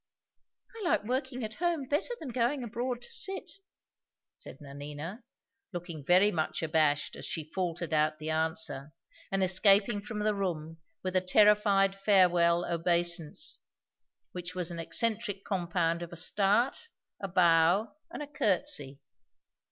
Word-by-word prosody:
"I 445 - -7
like 330 - +2
working 255 +2 -3
at 220 0 -5
home 335 -1 -1
better 295 - -1
than 300 - -7
going 250 +3 0
abroad 240 +2 -4
to - - -9
sit," 390 -4 -3 0.8
said - - -11
Nanina, 145 - -8 0.5
looking 170 -4 -6
very 185 +7 +5
much 160 -1 -2
abashed 155 -2 +1
as - - -9
she 160 -2 -5
faltered 175 -3 -3
out 155 0 +2
the 155 +1 -4
answer, 160 -2 -2 0.4
and 195 0 +1
escaping 200 +3 +4
from 210 +1 -7
the 210 0 +1
room 165 -5 -4 0.2
with 185 0 -3
a 185 - +4
terrified 200 0 +4
farewell 180 -4 +3
obeisance, 170 - 0 0.7
which 180 0 -7
was 180 -1 +2
an 170 - -6
eccentric 205 +2 -1
compound 170 -3 -1
of 170 - -7
a 170 - -8
start, 210 - +1 0.3
a 195 - -4
bow, 175 +2 +3 0.2
and 315 - -6
a - - -8
courtesy. 190 - 0
185 Hz, 140 wpm, -30 LUFS, 165-215 Hz, 0.8 s, very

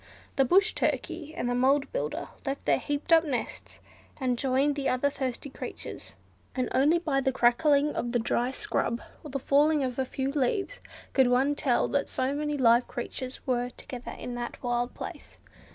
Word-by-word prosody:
The 270 - +4
Brush 395 - +4
Turkey 310 -2 -2
and - - -2
the 245 - +1
Mound 270 +3 +2
Builder - - -3
left 275 0 -4
their - - +3
heaped 290 +3 -1
up 325 0 +7
nests 275 -7 -4 0.4
and 255 -2 +1
joined 270 +3 +1
the 280 -2 0
other 270 +3 +1
thirsty 265 0 -4
creatures, - - -8 0.4
and 255 -1 0
only 290 +6 +4
by 295 -5 0
the 265 0 +1
crackling 280 +4 +3
of 240 - -2
the 245 - +2
dry 240 +1 0
scrub, 235 -2 -1 0.2
or 300 - -8
the 275 - -2
falling 290 +2 +3
of 255 -1 -2
a 265 - +1
few 265 +1 -2
leaves, 305 - -1 0.3
could 265 -2 +5
one 260 +4 +3
tell 265 -4 +1
that 280 0 0
so 260 +1 0
many 295 0 -1
live 240 -1 +4
creatures 255 +1 -6
were 245 -1 0
together 250 0 -8
in 245 - -6
that 240 +1 -6
wild 245 0 -1
place. - - -8
265 Hz, 185 wpm, -28 LUFS, 250-290 Hz, 0.4 s, up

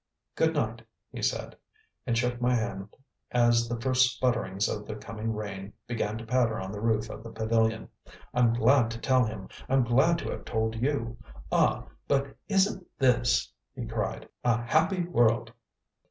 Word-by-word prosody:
"Good - - +1
night," - - -1 0.3
he - - -7
said, - - -1 0.5
and 115 -2 +1
shook 120 0 0
my 125 +1 +3
hand 105 -4 -3 0.4
as 120 -1 +3
the 120 -1 -2
first 130 +1 +3
sputterings 110 -5 +1
of 105 -1 -4
the 110 - -4
coming 110 +1 -5
rain 100 -2 -5
began 110 -3 -2
to 115 - -8
patter 115 -2 +1
on 95 0 -5
the 105 0 -6
roof 110 -1 +1
of - - -8
the 115 - -9
pavilion. 110 0 0 0.5
"I'm 120 -2 +4
glad 120 +1 +4
to 115 - -5
tell 130 0 +3
him; 110 -3 -6 0.2
I'm 135 0 +4
glad 135 +8 +3
to - - -4
have - - -6
told 110 0 -1
you. 120 -4 -1 0.3
Ah, - - +2 0.2
but 140 0 0
isn't 195 -1 +2
this," 125 -2 +2 0.2
he - - -4
cried, - - -3 0.2
"a 120 -1 +2
happy 165 +8 +2
world!" 120 -8 +2
115 Hz, 170 wpm, -28 LUFS, 110-125 Hz, 0.5 s, I'm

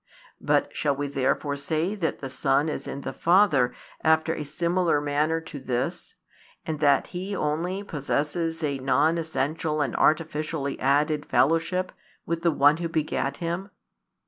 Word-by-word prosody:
But - - +1
shall 145 -2 +1
we 145 +1 -2
therefore 140 +1 0
say 155 +6 -1
that 185 -6 -2
the 135 - -4
Son 135 +3 +1
is 140 -2 -5
in 140 - -5
the - - -5
Father 165 -9 +4 0.3
after 160 0 +3
a 155 - -4
similar 170 +2 +1
manner 150 +3 0
to 150 -2 -8
this, 125 -2 -3 0.5
and 155 -2 -3
that 145 -2 +4
He 190 +3 -4
only 175 +5 -1
possesses 160 +1 -2
a 140 -2 -1
non 145 +5 +2
essential 155 0 -1
and 140 -5 -1
artificially 155 -2 0
added 145 +2 +1
fellowship 175 +4 +2 0.3
with 170 0 -2
the 170 - +3
One 145 0 +4
Who 170 0 -3
begat 150 -3 -1
Him? 175 +4 -3
155 Hz, 150 wpm, -26 LUFS, 145-165 Hz, 0.5 s, Father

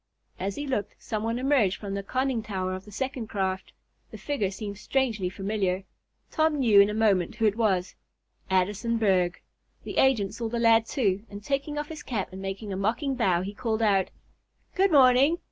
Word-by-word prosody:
As 195 +1 -2
he 290 - -4
looked, 255 -7 -2
some 215 -1 -4
one 230 +2 -1
emerged 255 -7 +2
from 200 -2 -6
the 200 - -2
conning 255 +3 -1
tower 190 -3 -3
of 185 +1 -7
the 210 - -13
second 255 +1 -4
craft. 190 -3 -2 0.4
The - - -9
figure 275 -10 -1
seemed 200 0 -7
strangely 220 -6 0
familiar. 195 -1 -2 0.5
Tom 315 -1 +2
knew 220 -7 +6
in 200 - +4
a - - -2
moment 210 -2 +2
who 225 -1 0
it 210 -1 +3
was 195 -6 +1 0.6
Addison 205 +5 +1
Berg. 185 -5 +2 0.4
The - - -6
agent 230 -8 +3
saw 230 -1 -4
the 235 - -2
lad, 225 -1 +4
too, 205 -8 0
and 205 0 -9
taking 280 +4 -2
off 295 0 -3
his 315 -1 -7
cap 215 -7 -3
and 190 - -7
making 195 +1 -5
a - - -3
mocking 230 +8 0
bow, 185 -9 +1
he 200 +2 -5
called 225 0 -1
out: 195 -3 +3 0.6
"Good 385 0 +3
morning! 275 +3 +5
215 Hz, 195 wpm, -27 LUFS, 195-255 Hz, 0.6 s, knew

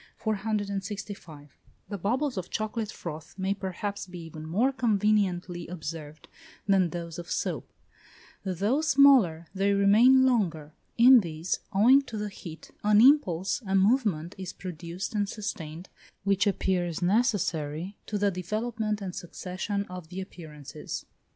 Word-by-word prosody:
The 200 -6 -3 0.5
bubbles 255 - 0
of 185 -2 -4
chocolate 215 0 -3
froth 160 +1 -8
may 190 +1 0
perhaps 200 +1 -4
be 180 0 -9
even 160 -1 -9
more 220 +12 +2
conveniently 200 -7 +1
observed 155 -3 -7 0.4
than 190 -3 +4
those 170 0 -6
of 170 - -8
soap; - - -3 0.7
though 200 - 0
smaller, 265 - +5
they 200 +1 +2
remain 225 +7 +6
longer. 170 - 0 0.2
In 250 +2 +9
these, 165 -2 -3
owing 245 +8 +6
to 220 - -5
the 210 0 -3
heat, 165 -4 -10
an 210 0 +5
impulse, 220 - +4
a 190 - +1
movement, 195 - +2
is 185 -2 -5
produced 175 +1 -6
and 205 -2 0
sustained, 180 -6 -6 0.4
which 200 +1 +2
appears 180 -3 0
necessary 180 - 0
to 210 - -2
the 205 0 +2
development 215 +3 -2
and 185 -2 -5
succession 185 +3 -4
of 180 -3 -9
the 185 +2 -6
appearances. 155 -7 -8
195 Hz, 130 wpm, -28 LUFS, 170-215 Hz, 0.7 s, In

